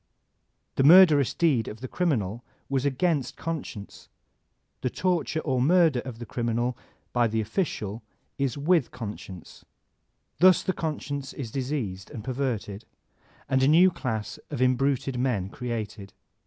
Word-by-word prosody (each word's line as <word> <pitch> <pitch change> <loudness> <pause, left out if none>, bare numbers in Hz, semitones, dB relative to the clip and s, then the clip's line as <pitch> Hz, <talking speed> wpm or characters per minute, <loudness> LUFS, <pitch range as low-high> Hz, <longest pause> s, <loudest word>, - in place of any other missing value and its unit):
The 135 - +3
murderous 155 -4 +7
deed 140 -10 +2
of 110 - -7
the 130 - -4
criminal 120 - -1 0.3
was 135 0 0
agamst 140 -1 0
conscience, 150 -11 -6 0.7
the 125 - 0
torture 170 0 -1
or 130 -5 0
the 125 - +2
murder 165 -6 +4
of 125 -2 -7
the 120 - -7
crim 120 +1 -3
inal 120 +2 0 0.4
by 120 -1 +3
the 110 0 -1
official 110 - -2 0.4
is 135 -3 0
with 155 -1 +2
conscience. 105 -6 -9 0.8
Thus 185 0 +6
the 185 - 0
conscience 145 -4 -4
is 120 -6 -6
diseased 125 -8 -3
and 110 - -8
perverted, 120 -5 -3 0.6
and 130 0 +2
a 130 - +4
new 175 +5 +6
class 110 -9 -4
of - - -5
imbruted 130 0 +1
men 115 -8 0
created. 110 -4 -5
130 Hz, 140 wpm, -26 LUFS, 115-150 Hz, 0.8 s, murderous